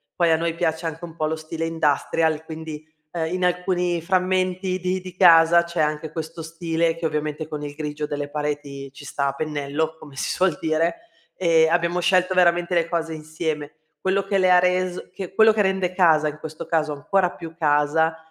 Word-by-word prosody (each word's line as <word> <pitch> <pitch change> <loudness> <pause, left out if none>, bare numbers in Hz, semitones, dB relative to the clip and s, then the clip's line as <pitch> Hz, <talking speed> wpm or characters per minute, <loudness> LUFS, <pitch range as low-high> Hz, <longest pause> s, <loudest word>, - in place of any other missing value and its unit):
Poi 170 -2 +2
a 160 - +4
noi 165 0 -1
piace 165 -1 -1
anche 165 +1 -5
un 165 -1 -8
po' 155 - -1
lo 155 +1 -1
stile 160 +1 -5
industrial, 160 0 0
quindi, 160 -1 -7 0.3
ehm, 165 0 -2
in 185 0 -2
alcuni 180 -1 0
frammenti 185 0 0
di 185 +1 -1
di 185 -1 -10
casa 170 -1 +7
c'è 170 -1 -2
anche 150 +1 -1
questo 160 0 -6
stile, 165 0 -1
che 165 -1 -2
ovviamente 150 0 -3
con 150 -1 -6
il 145 -1 -6
grigio 150 0 -4
delle 145 -1 -4
pareti 145 -2 -4
ci 145 - -12
sta 140 +1 -1
a 135 - -1
pennello, 150 +1 -2
come 145 -3 -13
si - - -2
suol 185 -3 +1
dire, 165 +1 +1 0.4
e 165 -3 +4
abbiamo 170 +1 +1
scelto 185 +1 +2
veramente 175 0 +3
le 170 -1 +2
cose 165 -1 -2
insieme. 155 -1 -4 0.3
Quello 195 +1 +1
che 195 0 0
le 185 -1 +4
ha 180 - +7
res 180 0 0
che 190 -1 -7
quello 220 +2 +6
che 215 - +2
rende 190 -2 0
casa, 160 -5 +4
in 150 0 -5
questo 155 +1 -7
caso, 155 -3 0
ancora 180 +5 +1
più 165 -1 -10
casa 155 +1 +2
165 Hz, 195 wpm, -23 LUFS, 155-180 Hz, 0.4 s, casa